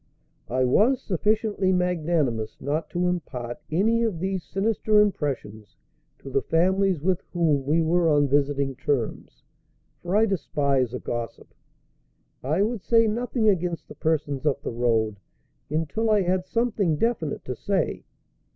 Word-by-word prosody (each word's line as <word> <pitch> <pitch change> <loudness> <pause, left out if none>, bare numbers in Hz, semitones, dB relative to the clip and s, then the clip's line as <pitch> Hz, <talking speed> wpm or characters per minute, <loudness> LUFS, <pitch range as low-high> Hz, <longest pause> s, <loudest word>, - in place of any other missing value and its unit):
I 130 +1 +1
was 225 - +3
sufficiently 205 0 0
magnanimous 160 -11 0
not 150 +3 -2
to 175 0 -1
impart 125 -9 -4
any 220 +8 +2
of 225 -7 0
these 190 0 -2
sinister 210 +5 +1
impressions 135 - -1 0.4
to 135 - -10
the 135 - +1
families 185 +4 +2
with 185 0 +1
whom 155 -6 +1
we 160 +3 +3
were 170 +1 +2
on 145 -1 +3
visiting 140 -1 +1
terms; 125 -3 -3 0.6
for 175 +2 -2
I 220 +2 +5
despise 140 - 0
a - - -4
gossip. 120 -2 -6 0.9
I 155 +9 +1
would 225 -1 -2
say 230 +2 +4
nothing 230 +1 0
against 180 -4 0
the - - -10
persons 150 -4 -1
up 145 -2 0
the - - -3
road 110 -3 0 0.5
until 165 +9 -1
I 210 -2 +4
had 185 +1 0
something 215 -8 +1
definite 170 -5 -1
to 125 - -4
say. 190 - -1
165 Hz, 140 wpm, -25 LUFS, 140-200 Hz, 0.9 s, I